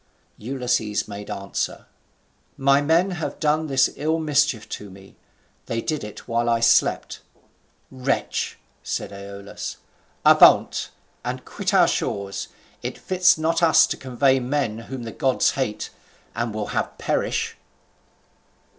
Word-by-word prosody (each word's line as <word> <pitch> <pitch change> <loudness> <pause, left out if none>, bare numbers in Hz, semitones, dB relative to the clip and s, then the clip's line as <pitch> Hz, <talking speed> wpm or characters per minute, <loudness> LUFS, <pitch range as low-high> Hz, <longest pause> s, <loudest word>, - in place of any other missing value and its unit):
Ulysses 125 -3 -1
made 105 0 -8
answer: 100 0 -4 0.7
"My 140 +1 +4
men 165 +6 +3
have 165 -3 -4
done 155 +1 +1
this 135 -2 +3
ill 155 +3 0
mischief 150 -7 +1
to 105 - -6
me; 95 +1 -15 0.5
they 115 - -1
did 155 +5 -2
it 105 -1 -9
while 120 0 0
I 115 0 +3
slept." 115 0 +2 0.7
"Wretch!" 130 0 -2 0.2
said - - -4
Aeolus, 100 0 -7 0.5
"avaunt, - - +6 0.3
and - - -4
quit - - -3
our - - +5
shores: 100 -1 -2 0.3
it - - -5
fits 180 -1 +3
not 165 +1 0
us 165 -2 +6
to - - -3
convoy 130 +1 +2
men 125 -4 -1
whom 130 -2 -5
the 115 - -6
gods 130 +2 +2
hate, 130 -6 -3 0.4
and 115 0 -1
will 105 0 -4
have - - -2
perish." - - -1
130 Hz, 130 wpm, -23 LUFS, 105-150 Hz, 0.7 s, avaunt